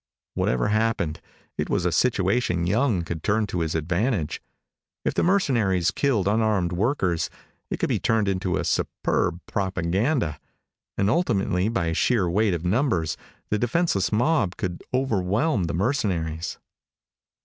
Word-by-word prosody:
Whatever 65 +9 0
happened, 110 -7 0 0.4
it - - -1
was 90 - 0
a 90 - +2
situation 95 -1 +1
Young 105 -1 +1
could 80 -1 -5
turn 105 +4 +1
to 95 -3 -3
his 80 -1 -1
advantage. 85 - -1 0.6
If - - +1
the - - +1
mercenaries 115 - +2
killed 120 -9 +1
unarmed 105 -4 +2
workers, 90 - 0 0.4
it - - -2
could - - -1
be - - +1
turned 110 -2 +1
into 95 -2 0
superb 85 - 0
propaganda. 95 - -1 0.6
And 100 - +2
ultimately, 105 - +1
by 85 -8 0
sheer 105 +1 +2
weight 100 +2 +2
of 85 +1 -5
numbers, 90 - +1 0.4
the 105 - +1
defenseless 120 - +1
mob 115 - +1
could 90 -2 -4
overwhelm 110 - +1
the 85 - -2
mercenaries. 90 - -1
95 Hz, 135 wpm, -25 LUFS, 85-115 Hz, 0.6 s, a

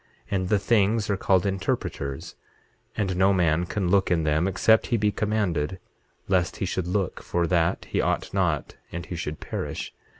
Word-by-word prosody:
And 95 -2 0
the 105 - +4
things 105 0 +2
are - - +2
called 95 -1 +2
interpreters, 85 -5 -2 0.6
and 95 -3 0
no 95 +2 +4
man 85 -2 +2
can 95 -3 -1
look 95 +1 +3
in 85 -2 +2
them 80 +3 +2
except 110 +3 +3
he 120 - +1
be 105 -1 +2
commanded, 100 -6 -1 0.5
lest 90 -3 +1
he - - -2
should 90 -1 -2
look 95 -1 -1
for 85 -1 0
that 85 0 +1
he - - 0
ought - - -1
not - - 0
and 85 0 -5
he 90 - -6
should 75 -2 -4
perish. - - -5
95 Hz, 175 wpm, -25 LUFS, 85-100 Hz, 0.6 s, the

